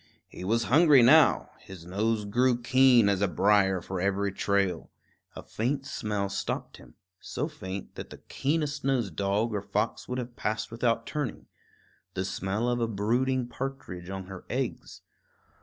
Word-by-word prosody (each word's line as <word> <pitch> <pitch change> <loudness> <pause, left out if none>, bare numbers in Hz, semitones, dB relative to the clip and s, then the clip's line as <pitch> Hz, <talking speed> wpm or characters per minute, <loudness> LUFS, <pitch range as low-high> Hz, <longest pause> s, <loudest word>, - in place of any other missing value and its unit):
He - - -10
was 115 +5 +1
hungry 145 +1 +6
now; 155 +6 +5
his 95 -4 -12
nose 105 +4 -1
grew 120 +4 +2
keen 125 -2 +5
as 100 -1 +1
a 100 - +3
brier 95 +1 +3
for 95 +1 -4
every 100 +1 0
trail. 100 -3 0 0.5
A - - -8
faint 135 +5 -2
smell 105 -5 -2
stopped 100 - -4
him, - - -17 0.2
so - - -4
faint 95 +1 -7
that - - -8
the - - -10
keenest 150 0 -2
nosed 120 - 0
dog 100 +3 0
or 105 - -1
fox 105 +3 -2
would 125 - -2
have 120 -1 -5
passed 110 0 -3
without 115 0 0
turning, 150 -6 -4 0.7
the 95 0 -1
smell 100 +4 -2
of 120 0 0
a 115 - +1
brooding 120 +5 0
partridge 125 -10 -6
on 95 -1 -5
her 95 -1 -9
eggs. - - -4
110 Hz, 160 wpm, -28 LUFS, 100-125 Hz, 0.7 s, hungry